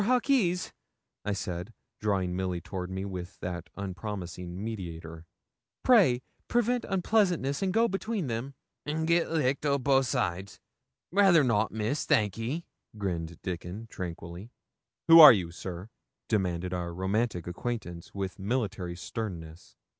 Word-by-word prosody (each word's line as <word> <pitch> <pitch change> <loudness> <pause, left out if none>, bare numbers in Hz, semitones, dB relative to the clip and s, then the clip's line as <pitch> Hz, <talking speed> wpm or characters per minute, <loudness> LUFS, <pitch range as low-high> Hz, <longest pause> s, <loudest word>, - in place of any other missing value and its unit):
Hawkes,' 235 -7 +2 0.5
I 105 - -1
said, 90 +2 -5 0.2
drawing 95 -4 0
Milly 90 -1 -1
with 90 -2 -4
me 95 +1 -4
toward 90 -3 -5
that 90 -1 -5
unpromising 90 -2 -5
mediator, 85 -6 -6 0.6
'pray 175 - +5 0.2
prevent 240 0 +1
unpleasantness 180 - +1
and 190 -1 +1
go 225 +4 +4
between 200 -1 -2
them.' 125 +3 -4 0.3
'An' 160 +2 -1
git 170 +1 +2
licked 140 -4 +1
o' 140 -1 +2
both 135 -1 +3
sides? 95 -3 -2 0.5
Rather 190 -5 +6
not, 110 -4 +2
Miss, 110 +7 -2
thank 105 -3 +3
ye,' 130 +10 -3 0.3
grinned 85 -5 -3
Dickon, 90 +4 -5
tranquilly. 85 +3 -7 0.6
'Who 165 0 +10
are 150 -3 +13
you, 90 -6 -2
sir?' 90 +4 -7 0.4
demanded 90 -4 0
our 85 -1 -3
romantic 95 0 -1
acquaintance, 90 -2 -5
with 95 -2 -4
military 100 -5 -2
sternness. 85 -5 -6
105 Hz, 130 wpm, -29 LUFS, 90-140 Hz, 0.6 s, are